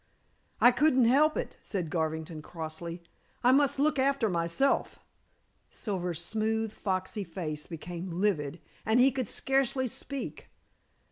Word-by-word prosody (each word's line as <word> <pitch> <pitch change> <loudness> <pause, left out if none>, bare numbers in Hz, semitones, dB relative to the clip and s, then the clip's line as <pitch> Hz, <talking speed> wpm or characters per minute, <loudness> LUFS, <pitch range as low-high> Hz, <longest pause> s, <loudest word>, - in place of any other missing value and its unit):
"I 245 - +8
couldn't 260 -1 +4
help 295 +6 +4
it," - - -4
said 180 -6 -3
Garvington 160 -1 -2
crossly. 165 +1 -6 0.4
"I 250 - +6
must 280 0 +4
look 295 0 +2
after 270 -4 +2
myself." 170 +10 +1 0.7
Silver's 180 -5 -3
smooth, 220 +1 -1
foxy 190 +1 -2
face 160 -4 -5
became 175 +2 -6
livid, 170 -4 0 0.2
and 220 +3 +3
he 265 +2 +6
could 260 -4 -2
scarcely 270 +1 +1
speak. 275 +3 -6
200 Hz, 125 wpm, -30 LUFS, 170-260 Hz, 0.7 s, I